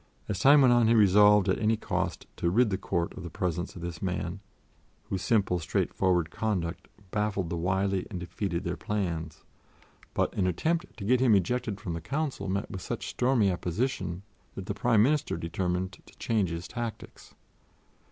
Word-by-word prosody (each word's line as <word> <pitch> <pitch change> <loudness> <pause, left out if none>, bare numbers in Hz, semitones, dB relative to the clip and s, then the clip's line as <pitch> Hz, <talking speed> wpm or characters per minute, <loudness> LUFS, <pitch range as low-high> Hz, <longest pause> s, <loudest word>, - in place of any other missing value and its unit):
As 100 - -2
time 140 +2 +7
went 125 -2 +6
on 120 -2 +4
he 115 - +4
resolved 105 -1 +6
at 95 - +1
any 110 +1 +2
cost - - -2
to 85 - +1
rid 110 +4 +3
the 95 - 0
Court 85 -3 -2
of - - -7
the 85 - -6
presence 90 -2 -3
of 85 - -8
this 85 -2 -5
man, 90 0 -3 0.6
whose 95 - -4
simple, 100 -6 +2
straightforward 90 0 0
conduct 95 -6 -2 0.2
baffled 105 -5 -1
the - - -1
wily 95 +2 0
and 95 -5 -5
defeated 85 0 -3
their - - -2
plans; 85 -7 -3 0.7
but - - +1
an 95 - +1
attempt 165 - -1
to 100 - -6
get 125 +4 +3
him 125 -4 +5
ejected 105 +2 0
from 90 -4 -4
the 80 - -4
Council 140 - -3
met 100 +2 -2
with 95 - -6
such - - -4
stormy 125 -6 +2
opposition 90 0 -2 0.3
that 95 - -6
the 100 - -2
Prime 110 +1 +3
Minister 145 - +1
determined 90 +2 -2
to - - -18
change 105 -6 0
his 85 +1 -5
tactics. 120 -2 -7
95 Hz, 180 wpm, -28 LUFS, 90-110 Hz, 0.7 s, time